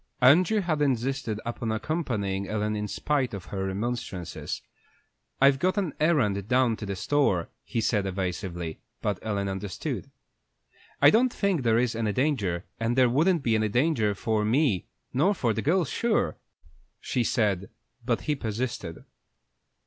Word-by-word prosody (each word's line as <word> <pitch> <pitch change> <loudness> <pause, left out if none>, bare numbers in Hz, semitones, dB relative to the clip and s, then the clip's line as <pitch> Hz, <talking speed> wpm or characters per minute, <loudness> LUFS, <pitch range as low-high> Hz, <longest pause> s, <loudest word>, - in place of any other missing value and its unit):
Andrew 175 - +5
had 160 -5 -1
insisted 130 -4 0
upon 120 -1 -3
accompanying 110 - -2
Ellen 105 0 -1
in 105 0 -2
spite 135 -2 -1
of 95 - -8
her 95 -1 -1
remonstrances. 100 -3 -4 0.8
"I've 135 0 +5
got 185 +5 +1
an 185 -7 0
errand 105 - +2
down 125 -2 +3
to 105 - -6
the 100 - -2
store," 95 -4 +1
he 115 - -2
said, 105 -3 +1
evasively; 90 -3 -3 0.2
but 105 -3 0
Ellen 100 -2 -2
understood. 95 0 -4 0.9
"I - - +9
don't 245 +3 +4
think 200 - 0
there 115 -2 +3
is 120 -1 +1
any 110 -2 -1
danger, 100 - 0
and 115 +1 0
there 130 -1 +5
wouldn't 160 +4 +3
be 115 - +2
any 110 -1 +2
danger 120 -4 +2
for 110 +2 0
me 110 - +2 0.3
not 175 +10 +2
for 115 -3 +1
the - - -2
girls, 165 0 +2
sure," 220 - +1 0.6
she 125 - -1
said; 100 -5 0 0.3
but 120 -1 0
he 150 - 0
persisted. 110 - -4
115 Hz, 150 wpm, -27 LUFS, 100-140 Hz, 0.9 s, I